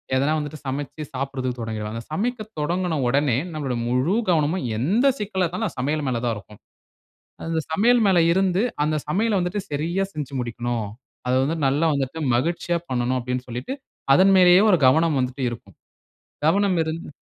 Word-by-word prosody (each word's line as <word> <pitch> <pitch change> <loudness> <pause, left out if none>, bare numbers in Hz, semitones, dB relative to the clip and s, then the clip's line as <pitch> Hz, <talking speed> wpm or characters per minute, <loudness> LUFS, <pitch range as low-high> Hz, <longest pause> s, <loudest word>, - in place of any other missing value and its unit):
எதனா 140 +4 +2
வந்துட்டு 150 +1 -6
சமைச்சி 145 +3 -4
சாப்பிடுறதுக்கு 130 -2 -3
தொடங்கிடுவாங்க. 110 0 -4
சமைக்கத் 220 +4 -3
தொடங்குன 170 0 -1
உடனே, 135 -1 +2
நம்மளோட 145 -5 -3
முழு 130 - +1
கவனமும் 160 0 +1
எந்த 200 - +2
சிக்கலா 195 -3 -1
இருந்தாலும், 180 +4 -3
சமையல் 145 +3 -1
மேல 120 -3 -1
தான் 115 -2 0
இருக்கும். 105 0 -14 0.9
அந்த 165 -1 0
சமையல் 235 +8 +4
மேல 190 -2 +4
இருந்து, 190 +2 +2 0.2
அந்த 155 - 0
சமையல் 205 +6 +1
வந்துட்டு 180 +3 -2
சரியா 170 +7 -1
செஞ்சு 145 -3 -5
முடிக்கணும். 120 -2 -3 0.4
அத 125 - +1
வந்து 160 +4 -1
நல்லா 145 +5 +1
வந்துட்டு 140 +3 -2 0.2
மகிழ்ச்சியா 170 +5 0
பண்ணனும் 125 0 0
அப்பிடின்னு 125 +1 -4
சொல்லிட்டு, 125 - -4 0.4
அதன் 195 +5 +5
மேலேயே 180 +1 +7
ஒரு 180 - +4
கவனம் 160 +1 +3
வந்துட்டு 130 +1 -2
இருக்கும். 120 - -10 0.7
கவனம் 195 +3 +3
இருந்து. 160 +2 -5
150 Hz, 155 wpm, -23 LUFS, 130-180 Hz, 0.9 s, மேலேயே